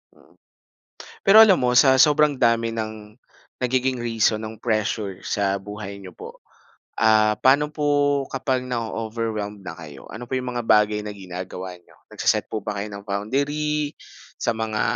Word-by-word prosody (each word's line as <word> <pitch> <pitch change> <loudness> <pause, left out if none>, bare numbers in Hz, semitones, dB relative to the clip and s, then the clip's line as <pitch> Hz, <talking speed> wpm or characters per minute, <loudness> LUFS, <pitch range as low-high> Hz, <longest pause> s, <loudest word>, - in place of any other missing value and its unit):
Mm. - - -24 0.9
Pero 200 +2 +7
alam 200 -5 +6
mo, 125 -1 +2
sa 135 -1 +6
sobrang 150 +1 +5
dami 115 -2 +1
ng 110 -1 -6 0.5
nagiging 130 0 0
reason 115 -2 +1
ng 110 -1 -7
pressure 110 -3 -1
sa 100 -1 0
buhay 100 0 -8
niyo 95 - -9
po, - - -11 0.6
ah, 110 -1 +5
paano 145 +3 +4
po 145 -2 +1
kapag 130 -1 -1
nao-overwhelm 110 -3 -4
na 80 - -5
kayo? 75 -4 -11
Ano 120 +2 -7
po - - -5
'yong 125 -1 -4
mga 120 - -3
bagay 105 -1 +3
na 105 - -5
ginagawa 90 -1 -7
niyo? 90 - -24 0.2
Nagse-set - - +1
po 110 - -3
ba 105 -1 -3
kayo 105 - -5
ng 100 0 -9
boundary 145 +8 -1 0.5
sa - - +1
mga 110 -1 -2
110 Hz, 155 wpm, -23 LUFS, 105-130 Hz, 0.9 s, Pero